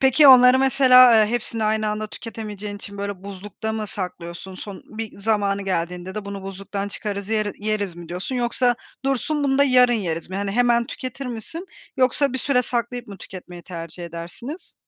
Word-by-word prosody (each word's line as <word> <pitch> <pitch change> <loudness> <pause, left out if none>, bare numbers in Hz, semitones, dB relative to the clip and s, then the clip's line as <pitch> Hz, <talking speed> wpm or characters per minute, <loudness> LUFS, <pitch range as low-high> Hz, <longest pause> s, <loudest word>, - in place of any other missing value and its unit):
Peki 265 +2 +6
onları 250 0 +9
mesela, 255 -2 +7
eee, 215 -1 +5
hepsini 230 -2 -2
aynı 215 0 +1
anda 210 0 -2
tüketemeyeceğin 210 -2 -7
için, 200 0 -9
böyle, 200 -2 -4
buzlukta 200 +2 -6
mı 220 -1 -3
saklıyorsun? 180 -1 -6
Son 195 +1 -8
bir 220 -1 -7
zamanı 200 -2 +1
geldiğinde 180 0 -3
de 215 -1 -4
"Bunu 200 -1 -6
buzluktan 195 +1 -5
çıkarız 200 -1 -4
yeri 215 -2 0
yeriz." 205 -5 -1
mi 170 -1 -10
diyorsun 180 +9 -4
yoksa 245 0 +2 0.3
"Dursun, 280 +2 0
bunu 270 -1 +2
da 280 - +6
yarın 250 -2 +5
yeriz." 170 -7 -2
mi? 190 - -3
Hani, 200 0 -2
hemen 235 +1 +3
tüketir 260 +1 -6
misin 250 - -6 0.3
yoksa 260 +1 +3
bir 260 - -1
süre 250 -1 +2
saklayıp 240 0 -3
mı 200 - -9
tüketmeyi 180 -1 -10
tercih 170 0 -7
edersiniz? 170 - -8
215 Hz, 180 wpm, -23 LUFS, 195-245 Hz, 0.3 s, onları